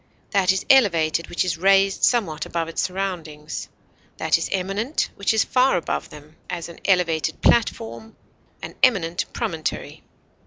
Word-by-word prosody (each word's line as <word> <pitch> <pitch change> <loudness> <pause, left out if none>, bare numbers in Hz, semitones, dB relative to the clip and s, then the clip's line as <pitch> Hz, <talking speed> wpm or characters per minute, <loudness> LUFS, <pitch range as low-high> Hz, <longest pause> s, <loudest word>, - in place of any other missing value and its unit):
That 195 -3 +3
is 190 - -2
elevated 170 - +3
which 175 - 0
is 170 -2 -2
raised 195 +1 +3
somewhat 165 -11 +1
above 165 -1 -2
its 165 - -2
surroundings; 170 -6 -4 0.5
that - - +2
is - - -3
eminent 195 +9 -1
which 200 - 0
is 220 - +3
far 255 -5 +2
above 170 - -3
them; 150 +1 -14
as, 175 -1 -5
an 170 - -12
elevated 175 -5 +1
platform; 225 -1 +1 0.5
an - - -6
eminent 180 -10 +2
promontory. 160 -2 -4
185 Hz, 145 wpm, -22 LUFS, 165-200 Hz, 0.5 s, That